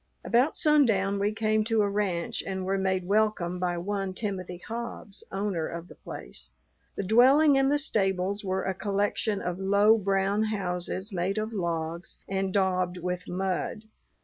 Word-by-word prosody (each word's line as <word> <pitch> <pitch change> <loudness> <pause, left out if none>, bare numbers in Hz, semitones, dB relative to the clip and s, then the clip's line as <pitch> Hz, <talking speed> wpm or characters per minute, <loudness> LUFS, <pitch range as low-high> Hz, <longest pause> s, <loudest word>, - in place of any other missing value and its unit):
About 250 +6 +2
sundown 220 -10 +3
we 205 +1 +1
came 215 0 +1
to 225 -2 +2
a - - +2
ranch 200 -4 -1
and 190 -1 -4
were 195 +1 0
made 190 -1 0
welcome 200 -3 +1
by 175 -1 -1
one 195 +1 -3
Timothy 185 -4 -4
Hobbs, 230 -3 -6
owner 195 -5 -1
of 170 +1 -7
the - - -12
place. - - -8 0.5
The - - -2
dwelling 265 +8 +6
and 270 0 +3
the 290 - +3
stables 200 -7 0
were 190 -1 -1
a 190 - -1
collection 205 +1 -1
of 180 +1 -3
low 200 +3 +4
brown 195 +2 +1
houses, 190 -1 -3
made 185 +3 -1
of 215 +1 -2
logs 170 -2 -3
and 190 0 -1
daubed 185 -2 +1
with 180 +1 -4
mud. 190 +4 -2
195 Hz, 160 wpm, -28 LUFS, 185-215 Hz, 0.5 s, dwelling